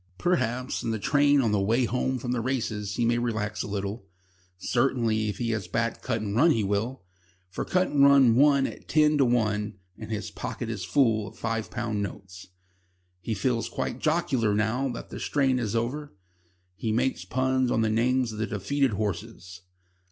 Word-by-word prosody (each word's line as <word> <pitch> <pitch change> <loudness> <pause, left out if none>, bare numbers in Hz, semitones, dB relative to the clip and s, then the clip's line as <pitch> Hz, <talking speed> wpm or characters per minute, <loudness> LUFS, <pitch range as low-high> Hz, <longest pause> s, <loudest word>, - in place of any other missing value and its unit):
Perhaps, 130 - 0
in - - -3
the 110 - -1
train 145 +6 +3
on 115 -4 +1
the 105 - +2
way 115 +6 +2
home 130 +2 -1
from 125 0 -4
the 125 -2 0
races, 110 -5 -2
he 120 - +1
may 120 +1 +2
relax 110 -3 -2
a - - -4
little. 100 +1 -4 0.5
Certainly, 115 -1 +1
if 100 - -4
he 115 -1 -1
has 110 -5 -3
backed 115 +6 -2
Cutandrun, 110 +8 +1
he 115 -9 +2
will. 105 +6 -2 0.5
For - - -3
Cutandrun 140 -8 +4
won 140 +2 +4
at - - -7
ten 150 -1 +3
to 135 - +5
one, 105 -3 0 0.2
and - - -8
his 105 -1 -4
pocket 115 - -5
is 105 -4 -5
full 110 -2 +2
of - - -12
five 115 -1 -2
pound 115 -4 -2
notes. 95 -2 -7 0.7
He 110 +5 -3
feels 115 +2 -1
quite - - -3
jocular 135 -10 +1
now 115 +6 0
that 120 - -7
the - - -6
strain 135 -3 +1
is 115 -2 -2
over. 130 +4 -3 0.6
He 110 +3 -2
makes 115 -6 0
puns 130 +5 0
on 115 - +1
the 110 - +2
names 125 +2 +1
of 110 - -7
the 110 - -1
defeated 120 +6 0
horses. 100 -2 -5
115 Hz, 180 wpm, -27 LUFS, 105-130 Hz, 0.7 s, to